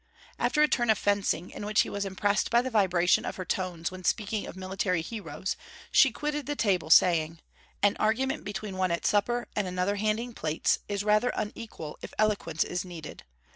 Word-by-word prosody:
After 300 Hz, -, +3 dB
a -, -, +5 dB
turn 240 Hz, -5 st, +1 dB
of 220 Hz, -, +5 dB
fencing, 200 Hz, -4 st, 0 dB
in -, -, -7 dB
which 210 Hz, +1 st, +3 dB
he -, -, -2 dB
was 200 Hz, 0 st, -2 dB
impressed 200 Hz, +2 st, 0 dB
by 235 Hz, +1 st, +4 dB
the 260 Hz, -, -3 dB
vibration 185 Hz, -5 st, +3 dB
of -, -, -4 dB
her 185 Hz, -, -5 dB
tones 175 Hz, -3 st, -2 dB
when 185 Hz, 0 st, -9 dB
speaking 210 Hz, +2 st, -1 dB
of -, -, -8 dB
military 185 Hz, -2 st, -1 dB
heroes, 185 Hz, -4 st, -4 dB, 0.4 s
she 270 Hz, -, +6 dB
quitted 295 Hz, +3 st, -3 dB
the 290 Hz, -, -1 dB
table, 185 Hz, -, +1 dB
saying: 165 Hz, -1 st, +5 dB, 0.5 s
'An 205 Hz, -, +4 dB
argument 255 Hz, +5 st, 0 dB
between 205 Hz, -1 st, -5 dB
one 185 Hz, -1 st, +1 dB
at 170 Hz, 0 st, -2 dB
supper 240 Hz, +4 st, +1 dB
and 205 Hz, -2 st, 0 dB
another 180 Hz, +3 st, -1 dB
handing 215 Hz, +3 st, -1 dB
plates, 160 Hz, -5 st, 0 dB
is 200 Hz, 0 st, -1 dB
rather 215 Hz, +3 st, +3 dB
unequal 210 Hz, -7 st, -6 dB
if -, -, -9 dB
eloquence 200 Hz, -7 st, +1 dB
is 180 Hz, -, -3 dB
needed. 170 Hz, -4 st, -9 dB
200 Hz, 190 wpm, -28 LUFS, 180-220 Hz, 0.5 s, she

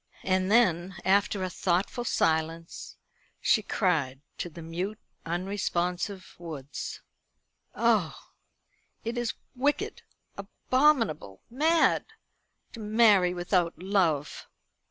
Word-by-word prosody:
And 185 Hz, +1 st, +1 dB
then, 185 Hz, -5 st, +3 dB
after 200 Hz, 0 st, +2 dB
a 185 Hz, -, -2 dB
thoughtful 190 Hz, +8 st, -1 dB
silence, 165 Hz, -3 st, -1 dB, 0.4 s
she 220 Hz, -, +3 dB
cried 160 Hz, -11 st, 0 dB, 0.2 s
to 175 Hz, -, -3 dB
the 165 Hz, +1 st, -10 dB
mute 180 Hz, +6 st, -4 dB, 0.3 s
unresponsive 180 Hz, +1 st, -2 dB
woods: 150 Hz, -5 st, -7 dB, 0.7 s
"Oh, -, -, +2 dB, 0.9 s
it 230 Hz, +2 st, -3 dB
is 240 Hz, -1 st, -2 dB, 0.2 s
wicked, 280 Hz, +4 st, -1 dB, 0.4 s
abominable, 225 Hz, -, +1 dB
mad, 315 Hz, +6 st, +3 dB, 0.7 s
to 230 Hz, -, -9 dB
marry 210 Hz, -4 st, +4 dB
without 175 Hz, -1 st, 0 dB
love!" 175 Hz, -6 st, 0 dB
185 Hz, 95 wpm, -28 LUFS, 170-215 Hz, 0.9 s, marry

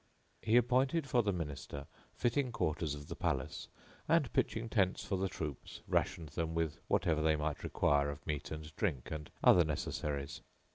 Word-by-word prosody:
He 110 Hz, +2 st, +4 dB
appointed 130 Hz, +5 st, +3 dB
for 125 Hz, -2 st, +4 dB
the 105 Hz, -3 st, +1 dB
Minister 70 Hz, -5 st, -5 dB, 0.3 s
fitting 125 Hz, +2 st, +1 dB
quarters 80 Hz, -6 st, -1 dB
of 75 Hz, 0 st, -9 dB
the -, -, -5 dB
palace; -, -, -2 dB, 0.4 s
and, -, -, +3 dB
pitching 115 Hz, +1 st, +1 dB
tents 95 Hz, -5 st, +1 dB
for 100 Hz, -, -1 dB
the 95 Hz, 0 st, 0 dB
troops, 75 Hz, -7 st, -6 dB
rationed 85 Hz, -5 st, 0 dB
them 80 Hz, +3 st, -2 dB
with 80 Hz, -2 st, -1 dB
whatever 80 Hz, -2 st, +2 dB
they 80 Hz, 0 st, +4 dB
might 75 Hz, 0 st, -2 dB
require 70 Hz, 0 st, +2 dB
of 70 Hz, 0 st, -7 dB
meat 75 Hz, -2 st, -3 dB
and 80 Hz, 0 st, -7 dB
drink 75 Hz, -, -1 dB
and 75 Hz, -1 st, -5 dB
other 90 Hz, -, +8 dB
necessaries. 75 Hz, +1 st, -3 dB
80 Hz, 170 wpm, -35 LUFS, 75-100 Hz, 0.4 s, other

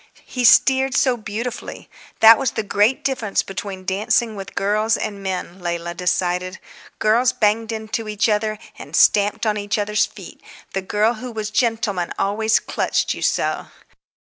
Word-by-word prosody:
He 250 Hz, -2 st, -2 dB
steered 265 Hz, +2 st, +5 dB
so 255 Hz, -2 st, +3 dB
beautifully. 230 Hz, +2 st, -6 dB, 0.3 s
That 225 Hz, 0 st, +9 dB
was 265 Hz, -, -1 dB
the 220 Hz, -, -2 dB
great 205 Hz, +5 st, +1 dB
difference 240 Hz, -7 st, -1 dB
between 195 Hz, -1 st, -7 dB
dancing 215 Hz, +4 st, 0 dB
with 195 Hz, -1 st, -9 dB
girls 215 Hz, +2 st, +1 dB
and 200 Hz, -2 st, -5 dB
men, 185 Hz, -1 st, -4 dB
Leila 170 Hz, 0 st, -3 dB
decided. 180 Hz, +1 st, -1 dB, 0.4 s
Girls 235 Hz, +3 st, +3 dB
banged 220 Hz, +1 st, +1 dB
into 220 Hz, 0 st, -4 dB
each 210 Hz, +1 st, +1 dB
other, 215 Hz, 0 st, 0 dB, 0.2 s
and -, -, -7 dB
stamped 205 Hz, +2 st, +3 dB
on 210 Hz, -1 st, +1 dB
each 205 Hz, +1 st, -2 dB
other's 210 Hz, 0 st, +1 dB
feet; -, -, -13 dB, 0.3 s
the 195 Hz, -, -1 dB
girl 210 Hz, +4 st, +1 dB
who 245 Hz, +2 st, -8 dB
was 215 Hz, -2 st, -5 dB
gentleman 220 Hz, -6 st, 0 dB
always 220 Hz, +2 st, +1 dB
clutched -, -, -1 dB
you -, -, -9 dB
so. -, -, 0 dB
215 Hz, 155 wpm, -21 LUFS, 195-225 Hz, 0.4 s, That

